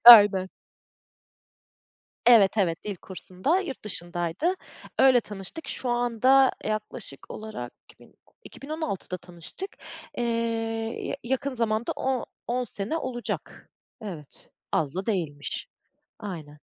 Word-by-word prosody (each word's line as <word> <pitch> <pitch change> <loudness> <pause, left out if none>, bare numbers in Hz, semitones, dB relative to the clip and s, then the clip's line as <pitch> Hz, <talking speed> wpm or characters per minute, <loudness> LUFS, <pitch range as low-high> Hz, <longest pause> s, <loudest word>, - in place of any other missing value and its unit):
Aynen. 205 -5 +11 1.8
Evet, 220 -4 +7
evet. 170 -5 +2
Dil 205 -2 -3
kursunda. 190 - -1
Yurt 350 -9 -5
dışındaydı. 175 - 0 0.5
Öyle 260 -2 +7
tanıştık. 210 - -7
Şu 255 - -1
anda, 245 +2 +5
yaklaşık 215 -9 -4
olarak 215 - -6 0.2
iki - - -17
bin - - -20
o - - -31
iki - - -12
bin 280 - -8
on 315 +1 -3
altıda 195 - -2
tanıştık. 175 - -8 0.5
Eee, 240 - +1 0.8
ya - - -1
yakın 265 +3 0
zamanda 230 -1 +1
o 260 -2 0 0.2
on 250 +1 +1
sene 215 +5 -2
olacak. 255 -6 -4 0.3
Evet, 165 -9 -8 0.2
az 150 -2 +1
da 190 +1 -2
değilmiş. 160 -10 -2 0.5
Aynen. 160 -7 -7
215 Hz, 120 wpm, -27 LUFS, 180-255 Hz, 1.8 s, Aynen